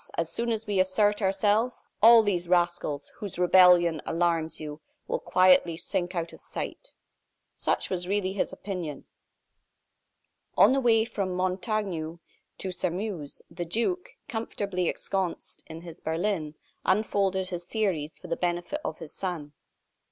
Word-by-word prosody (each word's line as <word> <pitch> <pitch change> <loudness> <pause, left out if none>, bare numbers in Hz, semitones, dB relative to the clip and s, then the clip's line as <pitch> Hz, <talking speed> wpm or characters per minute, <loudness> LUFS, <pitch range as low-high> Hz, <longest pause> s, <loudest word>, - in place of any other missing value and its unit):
As 165 -1 -1
soon 235 0 0
as 225 0 -2
we 205 -3 0
assert 205 +3 +3
ourselves, 205 +5 +1 0.2
all 230 +1 +9
these 180 -4 -1
rascals, 175 -5 +1
whose 205 -6 -6
rebellion 180 -3 +6
alarms 165 -1 0
you, 150 0 -7 0.3
will - - -1
quietly 185 -2 +4
sink 180 +1 -3
out 170 -1 -3
of - - -13
sight." - - -6 0.6
Such - - -1
was 180 -1 -2
really 190 -1 0
his 200 - -1
opinion. 175 -8 -5 1.5
On 215 +6 +7
the 275 - +3
way 225 -3 +4
from 195 -5 -3
Montaignac 185 -3 -2 0.4
to 190 - -3
Sairmeuse, 180 -4 -3
the 175 +1 -4
duke, 235 - -2
comfortably 200 -7 -2
ensconced 190 -3 -3
in 160 0 -8
his 170 -1 -10
berlin, 160 -2 -2 0.3
unfolded 190 -2 +1
his 175 -1 -5
theories 180 -7 -1
for - - -11
the 170 - -1
benefit 175 - -2
of - - -3
his 160 -3 -9
son. 165 -6 -4
185 Hz, 140 wpm, -28 LUFS, 170-205 Hz, 1.5 s, all